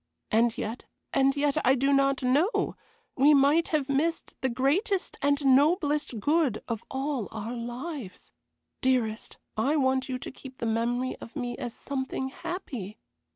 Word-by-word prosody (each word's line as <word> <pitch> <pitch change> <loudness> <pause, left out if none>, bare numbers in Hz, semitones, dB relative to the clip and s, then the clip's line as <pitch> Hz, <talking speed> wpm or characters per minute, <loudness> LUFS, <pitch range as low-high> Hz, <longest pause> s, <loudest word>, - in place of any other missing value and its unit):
And 230 +1 +3
yet, 225 +3 -4 0.3
and 275 0 +3
yet, 285 0 +1
I 260 +2 +5
do 275 +2 +2
not 275 -1 +2
know, 290 - +2 0.4
we 290 +3 +6
might 285 +5 +4
have 300 -4 0
missed 305 +4 0
the 260 - +1
greatest 310 - 0
and 285 0 +2
noblest 290 - +3
good 290 -2 +1
of 230 -3 -3
all 265 -4 -2
our 220 +2 -5
lives. 240 - -6 0.5
Dearest, 240 -4 0 0.2
I 270 +8 +1
want 260 -2 +1
you 255 - -1
to - - -7
keep 265 -1 -12
the - - -3
memory 240 +3 0
of 230 - -11
me 245 -4 -3
as 240 -2 -4
something 265 -1 -3
happy. 250 - -6
265 Hz, 155 wpm, -28 LUFS, 240-290 Hz, 0.5 s, we